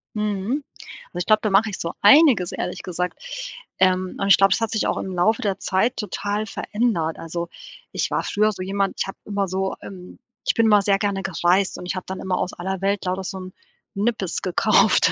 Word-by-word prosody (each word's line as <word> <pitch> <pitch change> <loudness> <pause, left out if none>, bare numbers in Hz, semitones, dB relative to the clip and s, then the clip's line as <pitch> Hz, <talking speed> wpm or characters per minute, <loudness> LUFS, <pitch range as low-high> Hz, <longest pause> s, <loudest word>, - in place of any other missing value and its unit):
Mhm. 210 +6 -1 0.5
Ich 175 +1 -3
glaube, 215 0 +4
da 215 - 0
mache 205 +3 +4
ich 195 - -6
so 170 - -3
einiges, 225 - +6
ehrlich 180 +1 -4
gesagt. 180 - -4 0.6
Ähm, 185 0 +2
und 195 - 0
ich 195 - +7
glaube 195 -1 +5
es - - -1
hat 225 - -1
sich 220 - 0
auch - - 0
im 190 - -4
Laufe 180 +6 +2
der 200 -2 -1
Zeit 220 +7 0
total 210 0 -2
verändert. 205 -7 -1
Also, 170 +1 -4 0.4
ich - - -1
war - - 0
früher 215 +1 +2
so 190 - -8
jemand 195 +1 -1
ich - - 0
habe 195 - -7
immer 200 -1 -1
so, 190 +1 -2
ähm 185 -2 -11 0.3
ich - - +2
bin 230 -1 +4
mal 210 -2 +6
sehr 195 0 +2
gerne 200 -1 -1
gereist 185 +1 +1
und - - -8
ich 180 - -3
habe 185 - -5
dann 190 0 -5
immer 185 -1 -1
aus 180 - -2
aller 190 +1 -4
Welt 200 0 0
lauter 185 +1 -2
so 190 +1 -5
'n 185 0 -8 0.4
Nippes 200 -3 -1
gekauft. 185 -2 +3
195 Hz, 215 wpm, -23 LUFS, 185-210 Hz, 0.6 s, ich